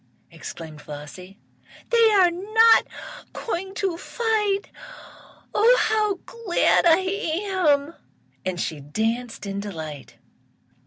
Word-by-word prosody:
exclaimed 155 -3 -9
Flossie. 150 +7 -10 0.5
"They 460 -1 +5
are 370 -3 +5
not 435 +6 +4 0.5
going 385 -2 -4
to 380 -4 -1
fight! 420 -4 -1 0.8
Oh, 480 +4 +5
how 430 -2 +1
glad 455 -7 +2
I 325 -1 +7 0.5
am!" 325 -6 +1 0.5
and 185 -1 -3
she 160 -4 -3
danced 225 - -3
in 200 0 -4
delight. 160 -8 -7
345 Hz, 100 wpm, -23 LUFS, -, 0.8 s, I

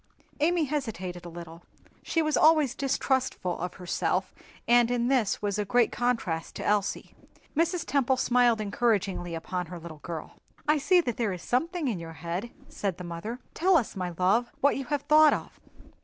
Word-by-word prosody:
Amy 335 +2 +2
hesitated 200 - -4
a - - -6
little; 170 0 -10 0.4
she 330 - 0
was 310 -1 +1
always 310 -4 +5
distrustful 265 -8 -1
of 180 +1 -4
herself, 185 +1 -1 0.3
and 240 0 +5
in 245 0 0
this 245 -7 +1
was 205 0 -1
a - - +1
great 240 +3 +2
contrast 230 -10 -1
to - - -5
Elsie. 205 -1 0 0.4
Mrs. 335 +3 +1
Temple 265 -2 +1
smiled 245 -2 +3
encouragingly 200 -5 0
upon 180 +2 -4
her 175 +1 -7
little 160 -2 -10
girl. 165 0 -7 0.3
"I 300 0 +4
see 355 +6 +4
that 240 -8 -3
there 220 -5 0
is 180 - -8
something 325 +5 -1
in 215 -8 -1
your 165 -1 -8
head," 170 +8 -4 0.2
said 195 -4 -3
the 180 - -7
mother; 180 +9 -6
"tell 365 +1 +4
us, 250 - -2
my 180 -2 -4
love, 205 +7 +2
what 285 - +3
you 270 - -4
have 290 +1 -2
thought 305 0 +6
of. - - -6
230 Hz, 180 wpm, -28 LUFS, 180-275 Hz, 0.4 s, thought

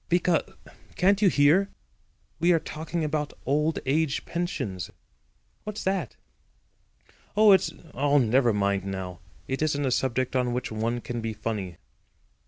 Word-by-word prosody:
"Because—can't 180 +3 0
you 200 - +6
hear? 165 +7 +4 0.7
We 170 +2 +4
are 165 - +3
talking 160 +2 -4
about 150 -1 -2
Old 150 +4 +1
Age 145 +1 0
Pensions." 140 - -3 0.7
"What's 210 0 -5
that?" 190 0 -1 1.2
"Oh, 215 -1 +7
it's—oh, 145 -6 +2
never 120 -1 +4
mind 100 -2 0
now. 95 -2 -5 0.3
It 135 +2 -2
isn't 145 -2 +1
a 130 - +1
subject 130 0 0
on 125 -1 +1
which 125 -1 -3
one 115 +2 -1
can 120 0 -4
be 110 0 -3
funny." 105 -5 -4
140 Hz, 130 wpm, -26 LUFS, 115-165 Hz, 1.2 s, Oh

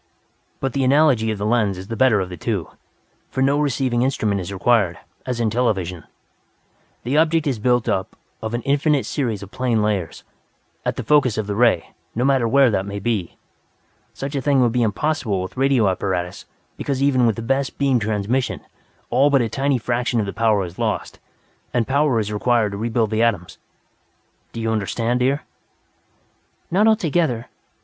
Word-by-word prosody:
"But 135 -2 -2
the 140 - 0
analogy 130 -4 +3
of 110 - -2
the 100 - -3
lens 105 -4 +1
is 95 +1 -8
the 115 - -4
better 115 -2 +4
of 90 - -4
the 90 - -6
two. - - -3 0.6
For 130 - -1
no 140 +2 +2
receiving 130 -4 0
instrument 110 -6 0
is 90 +2 -6
required, 100 -2 +2 0.3
as 125 -2 -2
in 115 -2 +1
television. 95 - -1 1.0
The 130 +5 0
object 160 0 +3
is 135 -6 -1
built 125 +1 +1
up 95 -1 -1 0.3
of 110 +1 -3
an 120 - -3
infinite 145 0 +1
series 115 -8 -2
of 100 - -11
plane 125 -4 0
layers, 100 -7 -2 0.6
at - - -1
the - - -4
focus 140 -7 +3
of 110 - -1
the 100 - -3
ray, 115 -5 +2 0.2
no 120 +3 0
matter 135 -4 +3
where 135 +1 +4
that 100 -1 -1
may 100 0 -5
be. 100 -3 -2 0.7
Such 135 +1 -6
a 135 - 0
thing 140 -1 +2
would 120 - +2
be 125 +1 0
impossible 115 -1 0
with 95 0 -6
radio 130 -4 +3
apparatus 90 -1 -2 0.3
because 135 -1 -2
even 130 -4 +3
with 110 - +1
the 115 - -6
best 135 +2 -1
beam 135 -3 +2
transmission, 110 +4 -1 0.5
all 135 +4 +4
but 135 -3 +3
a 115 - -2
tiny 135 +1 0
fraction 120 0 -1
of 105 - 0
the 100 - -5
power 110 -4 +2
is 85 0 -10
lost, - - -2 0.6
and 120 -2 +2
power 140 -3 +2
is 105 -1 -2
required 110 0 +1
to 100 - -5
rebuild 115 -1 0
the 110 +1 +1
atoms. 105 -7 0 0.9
Do 115 - -7
you 110 0 0
understand, 115 +3 -1
dear?" 135 +3 +1 1.3
"Not 205 +5 +4
altogether. 165 - +1
120 Hz, 185 wpm, -21 LUFS, 105-135 Hz, 1.3 s, better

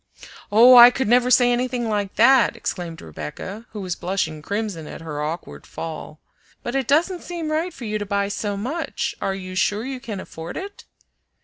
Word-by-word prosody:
"Oh, 240 +4 +8
I 240 0 +11
could 255 0 -2
never 245 +2 +4
say 245 -1 +5
anything 245 -1 -1
like 205 -2 -2
that!" 245 +2 +5
exclaimed 170 -3 -5
Rebecca, 80 - -8
who 210 - -7
was 180 -2 -3
blushing 175 -4 -2
crimson 200 -3 -4
at - - -8
her 150 -2 -5
awkward 155 +3 -6
fall. 160 -1 -7 0.4
"But 240 - -4
it 270 -3 -1
doesn't 340 +5 +2
seem 335 -3 -5
right 325 +4 -1
for 250 - -9
you 215 0 -2
to 205 - -4
buy 200 0 0
so 205 0 -3
much. 315 +7 -3
Are 195 - -1
you 185 -1 -7
sure 205 +4 0
you 265 -1 -5
can 225 -6 -6
afford 165 -2 -8
it?" 400 +2 -8
215 Hz, 190 wpm, -22 LUFS, 185-255 Hz, 0.4 s, I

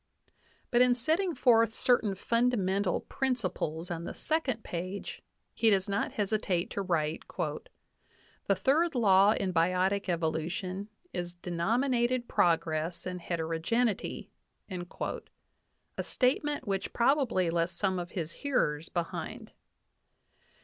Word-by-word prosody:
but 240 -1 +4
in 250 -1 +5
setting 320 +8 +1
forth 230 -3 +4
certain 225 -5 +2
fundamental 200 -4 +1
principles 185 - -2
on 170 -1 -3
the - - -6
second 280 -8 -1
page, 185 +3 -5 0.3
he 225 - +3
does 195 -3 +3
not 200 0 -1
hesitate 200 -4 0
to 200 - -2
write: 165 -4 0 1.3
"The - - +4
third 320 +4 +2
law 200 -3 +5
in 190 -4 -2
biotic 185 +4 +1
evolution 175 +4 -2 0.2
is 175 0 -4
denominated 240 +8 0
progress 165 -1 +1
in 180 -1 -4
heter 165 -2 -3
ogeneity," 230 +6 -1 1.6
a - - -2
statement 275 +1 0
which 195 -1 -2
probably 235 - +2
left 170 +1 0
some 185 +1 0
of 175 0 -5
his 170 -4 -4
hearers 165 - -1
behind. 170 -2 -4
195 Hz, 115 wpm, -30 LUFS, 175-240 Hz, 1.6 s, in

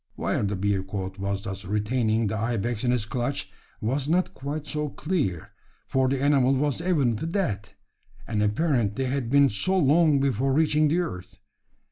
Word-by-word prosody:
Why - - -1
the 100 0 -1
bearcoot 95 -1 -2
was 100 0 -2
thus 100 -2 -5
retaining 110 +3 0
the 105 - -1
ibex 115 +1 -2
in 125 - +1
his 120 -3 +1
clutch 125 +4 -3 0.3
was 135 +6 -1
not 180 +3 +1
quite 145 +2 -5
so 150 +1 -2
clear: 140 - -2 0.3
for 130 -1 +1
the 135 0 0
animal 135 -2 +4
was 145 +2 0
evidently 150 - +1
dead; 120 - -2 0.6
and 110 -2 -1
apparently 115 0 +1
had 130 -2 -2
been 140 +1 +5
so 185 - 0
long 155 -2 +4
before 135 0 +1
reaching 155 0 +3
the 155 +4 +1
earth. 90 - -6
130 Hz, 160 wpm, -26 LUFS, 105-145 Hz, 0.6 s, been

